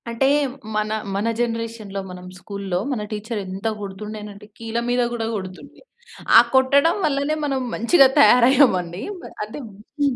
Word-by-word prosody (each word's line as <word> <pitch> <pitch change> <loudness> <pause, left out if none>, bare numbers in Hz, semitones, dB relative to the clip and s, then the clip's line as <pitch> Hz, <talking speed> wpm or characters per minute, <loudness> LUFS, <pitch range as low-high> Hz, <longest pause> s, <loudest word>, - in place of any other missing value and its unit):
అంటే, 235 +3 +1 0.5
మన 215 0 -1 0.2
మన 205 +3 -1
జనరేషన్‌లో 230 -4 -3
మనం 180 0 -10
స్కూల్లో, 195 -1 -4
మన 245 -5 -2
టీచర్రెంత 210 -2 -4
గొడుతుండేనంటే 210 +1 -8
కీళ్ళ 230 0 -3
మీద 245 0 +2
గూడా 230 -2 -3
గొడుతుండె. 185 -2 -9 0.6
ఆ - - +12
కొట్టడం 280 +5 +4
వల్లనే 285 +1 0
మనం 270 -2 -1 0.2
మంచిగా 270 +4 +5
తయారయ్యామండి. 240 - +4 0.2
మ - - -13 0.2
అంటే, 215 +7 -9 0.4
హ్మ్. 280 -3 +2
225 Hz, 130 wpm, -21 LUFS, 200-260 Hz, 0.6 s, ఆ